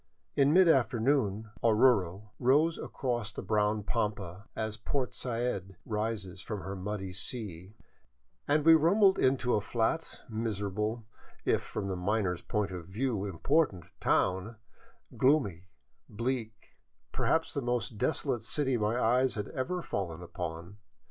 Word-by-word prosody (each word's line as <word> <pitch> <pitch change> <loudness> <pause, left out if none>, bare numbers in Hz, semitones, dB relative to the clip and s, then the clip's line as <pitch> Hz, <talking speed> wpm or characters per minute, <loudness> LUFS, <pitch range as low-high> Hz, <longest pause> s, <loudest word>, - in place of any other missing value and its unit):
In 140 +1 +4
mid 185 +2 +6
afternoon 120 -6 +2
Oruro 105 -4 +3
arose 150 +6 +3
across 120 -4 -2
the - - -6
brown 105 0 +1
pampa, 100 -4 -2
as 110 -1 -2
Port 125 +4 -2
Said 115 -6 -3
rises 105 -4 -3
from 105 0 -5
her 95 +1 -5
muddy 95 0 -4
sea, 95 -1 -5 0.7
and 150 +1 +2
we 165 - +9
rumbled 190 +5 +5
into 130 -1 +2
a 105 - +2
flat, 120 +9 -1
miserable, 110 0 -2 0.4
if - - +2
from 100 - -4
the 95 - -2
miner's 90 -1 0
point 105 -2 -1
of 90 -3 -7
view 110 +1 -1
important 100 - +1 0.2
town, 95 +5 +1 0.6
gloomy, 105 - +2 0.4
bleak, 115 -1 -4 0.3
per - - -2
haps 160 0 +2
the 140 - -1
most 120 -3 -2
desolate 130 -4 0
city 135 -4 0
my 110 +2 0
eyes 125 +2 +3
had 105 -1 -4
ever 175 +7 -3
fallen 85 -3 -3
upon. 85 +2 -6
110 Hz, 135 wpm, -31 LUFS, 100-130 Hz, 0.7 s, we